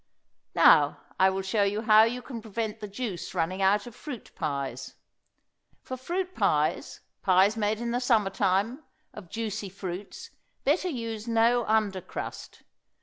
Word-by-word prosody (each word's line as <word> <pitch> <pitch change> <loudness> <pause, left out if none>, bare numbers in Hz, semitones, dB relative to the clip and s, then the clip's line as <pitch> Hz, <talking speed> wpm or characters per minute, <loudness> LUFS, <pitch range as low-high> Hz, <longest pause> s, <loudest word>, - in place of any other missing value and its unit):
Now - - +6 0.2
I 190 +1 +6
will 190 0 -2
show 195 +2 0
you 205 +2 +1
how 215 0 +7
you 245 +2 -3
can 235 -4 -7
prevent 220 0 -4
the 210 - -6
juice 200 -4 -5
running 185 +4 -1
out 200 +2 +3
of 240 - -10
fruit 260 -7 -8
pies. 140 -2 -4 0.9
For 260 - -5
fruit 360 +8 -3
pies - - 0 0.2
pies 190 +3 +4
made 215 -1 0
in 235 0 -2
the 245 - 0
summer 220 -6 +2
time, 205 +9 0 0.3
of 180 - -11
juicy 215 -2 -4
fruits 190 0 -7 0.3
better 350 +6 +2
use 230 -5 -5
no 230 +1 +3
under 215 -4 +1
crust. 185 - -7
215 Hz, 150 wpm, -28 LUFS, 195-235 Hz, 0.9 s, how